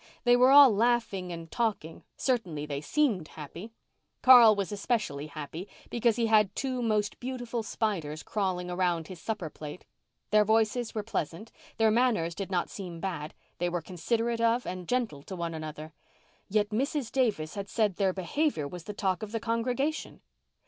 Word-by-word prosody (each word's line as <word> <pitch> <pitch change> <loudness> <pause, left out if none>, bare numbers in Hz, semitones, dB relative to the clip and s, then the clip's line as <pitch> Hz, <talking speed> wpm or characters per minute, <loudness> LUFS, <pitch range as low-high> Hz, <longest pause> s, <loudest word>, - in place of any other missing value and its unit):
They 245 0 +5
were 250 +1 +6
all 280 -2 +9
laughing 215 -5 +1
and 165 -1 -8
talking—certainly 210 - -2
they 145 -1 -4
seemed 210 - +1
happy. 165 +9 -9 0.5
Carl 240 -4 +9
was 200 -2 -2
especially 200 - -2
happy 155 +4 -7 0.2
because 235 -1 +2
he 235 -1 +1
had 215 -3 +3
two 255 -2 -2
most 215 -3 0
beautiful 245 -2 -4
spiders 175 -9 -2
crawling 185 -4 -2
around 175 -3 0
his 185 -3 -9
supper 210 -7 -3
plate. 150 +3 -9 0.5
Their 210 0 +6
voices 225 +2 +1
were 215 - -1
pleasant, 205 0 -4 0.3
their 220 -1 +4
manners 220 -8 +2
did 195 +2 -5
not 180 -2 -1
seem 180 -4 -7
bad, 165 -4 -4 0.2
they 175 0 +1
were 175 0 -1
considerate 230 +8 -1
of 230 +1 +2
and 180 -1 -5
gentle 240 - -1
to 190 - -8
one 170 -1 -3
another. 155 0 -7 0.6
Yet 210 +1 +1
Mrs. 265 +3 -1
Davis 210 -13 0
had 200 -1 -5
said 210 -5 +1
their 195 -2 +2
behaviour 185 - -1
was 175 +3 -9
the 210 - -5
talk 190 -3 -1
of 215 -1 -6
the 225 - -2
congregation. 245 +6 -2
205 Hz, 165 wpm, -29 LUFS, 170-235 Hz, 0.6 s, all